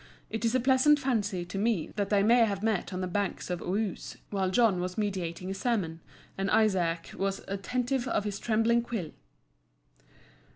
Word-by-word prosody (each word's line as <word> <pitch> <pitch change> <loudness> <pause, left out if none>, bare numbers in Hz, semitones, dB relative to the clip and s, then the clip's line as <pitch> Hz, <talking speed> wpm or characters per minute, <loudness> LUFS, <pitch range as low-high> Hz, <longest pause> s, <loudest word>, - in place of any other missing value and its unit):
It 225 - -3
is 230 +2 +2
a - - +4
pleasant 265 +4 +5
fancy, 205 -10 -1
to 195 +3 -5
me, 210 -6 0
that 200 -1 -1
they 200 -1 +3
may 235 +3 +6
have 200 -2 -3
met 215 -4 0
on 185 0 -3
the 185 - -1
banks 195 0 -2
of 175 - -2
Ouse, 200 +1 -3
while 190 -2 0
John 200 -3 +3
was 180 0 -4
meditating 185 -3 -2
a - - -1
sermon, 195 -6 -1 0.4
and 195 0 0
Izaak 175 -6 +2
was 195 0 -2
"attentive 250 +6 -1
of 215 - 0
his 205 -1 -4
trembling 230 +1 +2
quill." 225 -9 -4
205 Hz, 175 wpm, -29 LUFS, 185-230 Hz, 0.4 s, may